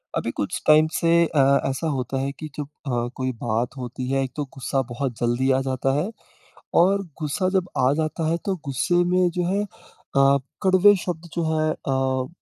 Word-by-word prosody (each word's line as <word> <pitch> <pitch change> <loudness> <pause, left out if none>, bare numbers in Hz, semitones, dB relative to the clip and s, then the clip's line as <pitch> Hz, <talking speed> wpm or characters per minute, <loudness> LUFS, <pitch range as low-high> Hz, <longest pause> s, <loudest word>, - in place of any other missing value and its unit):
अभी - - -1
कुछ - - -3
टाइम 155 +1 +6
से 165 - +1 0.2
अ, 160 -2 -1 0.3
ऐसा 135 +5 -2
होता 135 -2 -2
है 135 +1 -1
कि 155 - -5
जब 150 - -2 0.2
अ, 120 -2 0
कोई 130 0 -2
बात 120 +2 -1
होती 125 0 -5
है 135 0 +1
एक 130 - -5
तो 150 - -2
गुस्सा 135 0 -1
बहुत 120 -1 -3
जल्दी 120 +3 +1
आ 130 0 +2
जाता 135 0 -1
है। 180 - -1 0.7
और 195 +3 +4 0.2
गुस्सा 185 +6 0
जब 185 -1 0
आ 130 +1 +4
जाता 155 +1 -1
है 165 - +1
तो 195 -2 0
गुस्से 140 +6 0 0.2
में 180 0 +3
जो 180 - +1
है 195 +3 +1
अ, 140 -7 0 0.3
कड़वे 190 +2 +6
शब्द 170 -1 -4
जो 170 - 0
हैं 155 0 +1
अ, 130 -2 -1
140 Hz, 195 wpm, -23 LUFS, 130-170 Hz, 0.7 s, टाइम